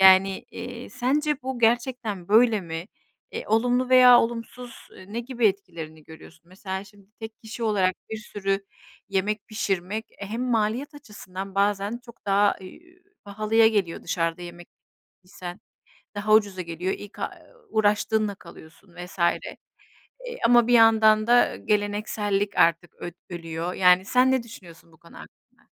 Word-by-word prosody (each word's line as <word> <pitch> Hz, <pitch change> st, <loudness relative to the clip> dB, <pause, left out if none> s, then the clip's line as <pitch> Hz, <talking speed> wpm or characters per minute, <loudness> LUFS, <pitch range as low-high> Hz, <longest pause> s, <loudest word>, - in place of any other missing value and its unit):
Yani, 190 Hz, 0 st, +6 dB
iii, -, -, -8 dB
sence 295 Hz, +4 st, 0 dB
bu 260 Hz, -1 st, -4 dB
gerçekten 230 Hz, -5 st, 0 dB
böyle 220 Hz, -1 st, +5 dB
mi? 165 Hz, 0 st, -6 dB, 0.5 s
E, -, -, -5 dB
olumlu 245 Hz, +3 st, +1 dB
veya 250 Hz, -1 st, +8 dB
olumsuz, 240 Hz, +1 st, -6 dB
ııı, 185 Hz, +2 st, -14 dB
ne 235 Hz, -, -1 dB
gibi 240 Hz, -2 st, 0 dB
etkilerini 170 Hz, -6 st, -4 dB
görüyorsun? 160 Hz, +1 st, -15 dB
Mesela 190 Hz, +1 st, -6 dB
şimdi 200 Hz, 0 st, -19 dB
tek 220 Hz, 0 st, -8 dB
kişi 225 Hz, +1 st, -8 dB
olarak 195 Hz, -4 st, +2 dB, 0.2 s
bir 220 Hz, -, -3 dB
sürü 195 Hz, -2 st, -3 dB, 0.4 s
yemek 200 Hz, +3 st, -2 dB
pişirmek, 210 Hz, 0 st, -2 dB
e, 200 Hz, -, -6 dB
hem 230 Hz, +4 st, -4 dB
maliyet 235 Hz, +6 st, 0 dB
açısından 195 Hz, -7 st, -9 dB
bazen 205 Hz, +3 st, 0 dB
çok 235 Hz, -3 st, -16 dB
daha, 200 Hz, +1 st, +3 dB
ııı, 185 Hz, -, -9 dB, 0.5 s
pahalıya 215 Hz, +2 st, +3 dB
geliyor 195 Hz, -6 st, -1 dB
dışarıda 165 Hz, 0 st, -2 dB
yemek 175 Hz, 0 st, -10 dB, 0.6 s
isen 180 Hz, +1 st, -9 dB, 0.6 s
daha 210 Hz, +1 st, +1 dB
ucuza 200 Hz, -4 st, +3 dB
geliyor, 170 Hz, +2 st, -3 dB
ilk 205 Hz, -, -12 dB
a -, -, -3 dB, 0.2 s
uuu, 470 Hz, -2 st, -26 dB
uğraştığınla 210 Hz, 0 st, +1 dB
kalıyorsun 170 Hz, +1 st, -16 dB
vs. 180 Hz, +1 st, -10 dB
E, 170 Hz, -, -2 dB, 0.7 s
ama 240 Hz, -1 st, +5 dB
bir 245 Hz, -, +1 dB
yandan 220 Hz, -1 st, +5 dB
da 245 Hz, 0 st, +4 dB
geleneksellik 205 Hz, -1 st, -1 dB
artık 170 Hz, +1 st, +2 dB
öd 175 Hz, -, -7 dB, 0.2 s
ölüyor. 165 Hz, +1 st, -5 dB
Yani, 180 Hz, 0 st, +5 dB
sen 250 Hz, +4 st, +3 dB
ne 260 Hz, -3 st, +1 dB
düşünüyorsun 170 Hz, -7 st, -14 dB
bu 160 Hz, -, -21 dB
konu 170 Hz, -, -17 dB
hakkında? -, -, -17 dB
205 Hz, 145 wpm, -25 LUFS, 185-225 Hz, 0.7 s, veya